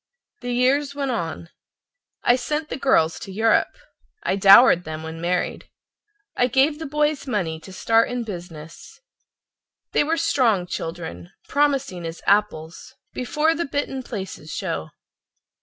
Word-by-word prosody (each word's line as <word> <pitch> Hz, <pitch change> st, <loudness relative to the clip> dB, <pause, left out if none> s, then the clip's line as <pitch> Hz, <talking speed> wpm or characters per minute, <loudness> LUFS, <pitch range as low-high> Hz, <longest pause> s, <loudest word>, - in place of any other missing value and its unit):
The 245 Hz, 0 st, -4 dB
years 275 Hz, +3 st, +1 dB
went 275 Hz, -2 st, -2 dB
on. 165 Hz, -6 st, -4 dB, 0.7 s
I 245 Hz, -, +5 dB
sent 300 Hz, +5 st, -3 dB
the -, -, -3 dB
girls 165 Hz, -13 st, +2 dB
to 195 Hz, -, -8 dB
Europe; 220 Hz, +3 st, +2 dB, 0.5 s
I -, -, 0 dB
dowered 195 Hz, -1 st, +7 dB
them 160 Hz, -1 st, -6 dB
when 160 Hz, +1 st, -7 dB
married. 180 Hz, +1 st, -2 dB, 0.7 s
I 245 Hz, -, +2 dB
gave 270 Hz, +5 st, +2 dB
the 320 Hz, -, -5 dB
boys 295 Hz, 0 st, 0 dB
money 175 Hz, -10 st, -2 dB
to 190 Hz, -, -13 dB
start 225 Hz, +4 st, +2 dB
in 245 Hz, -1 st, -3 dB
business. 170 Hz, -6 st, -10 dB, 0.9 s
They -, -, +3 dB
were 320 Hz, +3 st, 0 dB
strong 225 Hz, -, +2 dB
children, 165 Hz, -, -6 dB, 0.2 s
promising 275 Hz, -10 st, 0 dB
as 165 Hz, +1 st, -8 dB
apples 195 Hz, -6 st, 0 dB, 0.2 s
Before 300 Hz, +5 st, +1 dB
the 340 Hz, +1 st, -2 dB
bitten 275 Hz, -1 st, -3 dB
places 190 Hz, -10 st, -7 dB
show. 80 Hz, -, -4 dB
225 Hz, 140 wpm, -23 LUFS, 170-275 Hz, 0.9 s, dowered